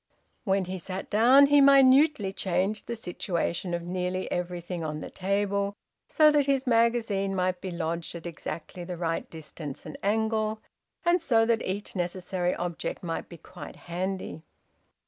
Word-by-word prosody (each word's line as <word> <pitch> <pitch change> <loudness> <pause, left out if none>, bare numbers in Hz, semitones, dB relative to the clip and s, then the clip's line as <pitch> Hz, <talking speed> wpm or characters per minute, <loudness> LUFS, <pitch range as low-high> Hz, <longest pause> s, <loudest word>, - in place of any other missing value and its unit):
When 195 -2 +1
he 185 +1 -5
sat 185 +2 -6
down 250 +6 +7
he 285 0 +5
minutely 275 -5 +5
changed 190 +3 -1
the 235 - -3
situation 175 -3 -2
of 170 - -4
nearly 180 +1 -3
everything 175 -1 -3
on 150 -1 -3
the - - -8
table, 200 +1 -1 0.3
so 305 -1 +5
that 290 -2 +2
his 275 -1 +1
magazine 230 -5 +2
might 185 -1 0
be 190 - -4
lodged 170 -1 -3
at 170 - -8
exactly 170 +1 -6
the 175 0 -6
right 165 -1 -2
distance 155 -3 -8
and 155 - -8
angle, 220 +1 0 0.5
and 345 0 +3
so 225 -7 +3
that 230 -1 +2
each 200 +3 -4
necessary 180 0 -1
object 175 0 -4
might 165 -2 -4
be 170 - -10
quite 175 +3 -11
handy. 185 -1 -4
190 Hz, 155 wpm, -27 LUFS, 175-225 Hz, 0.5 s, down